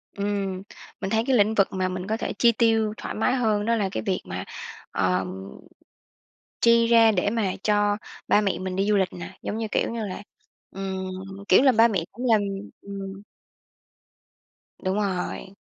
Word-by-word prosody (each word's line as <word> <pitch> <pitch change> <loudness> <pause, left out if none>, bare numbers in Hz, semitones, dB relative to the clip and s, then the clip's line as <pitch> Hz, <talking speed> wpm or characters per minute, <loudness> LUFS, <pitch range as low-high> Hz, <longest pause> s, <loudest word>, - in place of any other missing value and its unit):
Ừm. 200 -2 -2 0.4
Mình 190 - -2
thấy 220 +1 +2
cái 265 - +4
lĩnh 210 +1 +4
vực 195 -2 +4
mà 185 -1 0
mình 185 0 -5
có 220 +1 0
thể - - -3
chi 235 - +6
tiêu 225 -2 +2
thoải - - -5
mái 250 +4 +2
hơn 215 -4 +1
đó 230 +1 +2
là 205 -4 0
cái - - -3
việc 195 -4 -1
mà, 90 0 -5 0.5
ờm 95 +1 -1 1.2
chi 230 0 +5
ra 230 -1 +6
để 200 +1 +1
mà 210 -4 0
cho 205 -1 +3 0.3
ba - - +5
mẹ 200 -2 0
mình 185 0 -4
đi 195 +1 +1
du 210 - +4
lịch 190 -2 +1
nè, 175 - -9
giống 215 - -3
như 225 - -2
kiểu - - +1
như 230 -2 -3
là, 190 +1 -6 0.5
ừm, 190 -1 -4 0.4
kiểu 190 - +7
là, 265 -2 +6
ba 230 +1 +6
mẹ 195 -7 -1
cũng 245 +5 -7
làm, 220 -2 +5 0.4
ừm 195 0 -7 1.6
Đúng 190 +2 0
rồi. 190 -2 -2
205 Hz, 185 wpm, -25 LUFS, 190-225 Hz, 1.6 s, kiểu